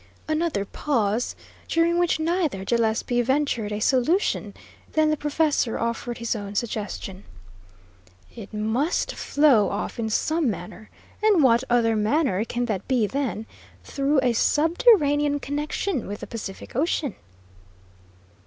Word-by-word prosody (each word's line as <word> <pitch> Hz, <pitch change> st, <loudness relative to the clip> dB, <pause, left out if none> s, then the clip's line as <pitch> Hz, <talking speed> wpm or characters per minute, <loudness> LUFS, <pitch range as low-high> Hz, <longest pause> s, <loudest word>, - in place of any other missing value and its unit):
Another 310 Hz, -9 st, 0 dB
pause, 230 Hz, -2 st, -1 dB, 0.3 s
during 335 Hz, +1 st, +2 dB
which 350 Hz, -2 st, +2 dB
neither 315 Hz, -, -1 dB
Gillespie 235 Hz, +2 st, +1 dB
ventured 255 Hz, -4 st, 0 dB
a 210 Hz, -, -2 dB
solution; 275 Hz, -, +1 dB, 0.4 s
then 310 Hz, 0 st, +3 dB
the -, -, +2 dB
professor 295 Hz, -4 st, 0 dB
offered 235 Hz, +1 st, -3 dB
his 235 Hz, 0 st, -2 dB
own 205 Hz, -1 st, -6 dB
suggestion: 205 Hz, -3 st, -4 dB, 1.1 s
"It 220 Hz, -4 st, -9 dB
must 220 Hz, +9 st, -1 dB
flow 280 Hz, -8 st, +3 dB
off 205 Hz, +3 st, -4 dB
in 220 Hz, -1 st, -1 dB
some 310 Hz, +5 st, +1 dB
manner, 195 Hz, +3 st, -7 dB, 0.3 s
and 415 Hz, -7 st, +4 dB
what 240 Hz, -1 st, +4 dB
other 230 Hz, -2 st, +3 dB
manner 215 Hz, -, +1 dB
can 240 Hz, +1 st, -2 dB
that 205 Hz, -5 st, -3 dB
be 250 Hz, -5 st, +2 dB
than 240 Hz, -2 st, -3 dB, 0.4 s
through 275 Hz, +1 st, +1 dB
a 245 Hz, -2 st, +2 dB
subterranean 295 Hz, -, +3 dB
connection 295 Hz, -, -2 dB
with 205 Hz, +1 st, -6 dB
the -, -, -5 dB
Pacific 215 Hz, -4 st, -8 dB
Ocean?" 285 Hz, -, 0 dB
245 Hz, 125 wpm, -24 LUFS, 220-300 Hz, 1.1 s, and